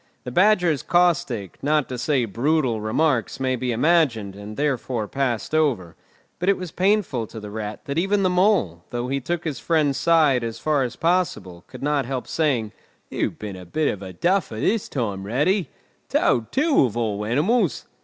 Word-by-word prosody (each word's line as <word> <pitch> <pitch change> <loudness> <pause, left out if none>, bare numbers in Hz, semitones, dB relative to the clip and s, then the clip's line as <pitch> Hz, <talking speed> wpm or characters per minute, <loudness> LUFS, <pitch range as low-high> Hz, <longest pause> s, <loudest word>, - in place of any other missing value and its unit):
The 125 - -6
Badger's 180 - +3
caustic, 170 - +1
not 150 0 +1
to 125 - -4
say 135 -2 +1
brutal, 120 +1 0
remarks 125 +4 0
may 130 -1 0
be 125 0 -2
imagined, 120 - +2
and 105 +1 -9
therefore 130 -6 -1
passed 130 -1 -2
over; 120 - +1 0.4
but 180 +2 +1
it 200 - +3
was 180 -3 -6
painful 185 - +1
to 110 - -9
the 105 -1 -8
Rat 105 -1 -5
that 140 +3 -1
even 195 +2 +1
the 185 - +3
Mole, 180 - +2
though 120 +1 -3
he 140 +1 0
took 170 +5 -3
his 150 -6 -3
friend's 150 -5 +1
side 155 -7 +3
as 115 -1 -4
far 150 -2 +1
as 125 -2 -2
possible, 165 - -1
could 130 0 -10
not 145 -3 0
help 130 -1 -4
saying, 130 -10 0 0.4
"You've - - -2
been 105 -3 -6
a 90 - -9
bit 150 - 0
of 100 - -4
a 95 -1 -7
duffer 175 - 0
this 215 - 0
time, 105 -7 -3
Ratty! 150 - +1 0.4
Toad, 115 -2 +1
too, 295 - +3
of 115 -2 -4
all 105 -3 -1
animals!" 160 - +1
135 Hz, 185 wpm, -23 LUFS, 110-165 Hz, 0.4 s, Badger's